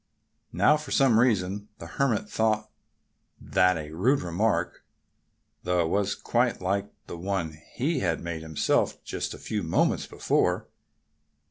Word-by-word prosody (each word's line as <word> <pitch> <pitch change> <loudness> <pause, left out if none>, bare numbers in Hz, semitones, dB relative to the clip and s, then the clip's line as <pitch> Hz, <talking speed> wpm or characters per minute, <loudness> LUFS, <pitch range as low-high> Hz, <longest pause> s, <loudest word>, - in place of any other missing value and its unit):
Now, 150 - +4
for 150 - -9
some 130 -5 +4
reason 100 -4 +1
the - - -9
Hermit 135 -6 0
thought 110 -1 0 0.7
that 90 0 +2
a 75 -1 -6
rude 115 - +2
remark, 90 +5 -1 0.8
though 90 0 0
it 80 - 0
was 100 +1 0
quite 120 +1 0
like 100 +2 -1
one 85 -1 -3
that 80 - -15 0.2
he 145 +3 0
had 85 -6 0
made 85 -2 -5
himself 80 -2 0
but - - -3
a - - -10
few - - -3
moments - - +1
before. - - 0
100 Hz, 140 wpm, -27 LUFS, 85-115 Hz, 0.8 s, Now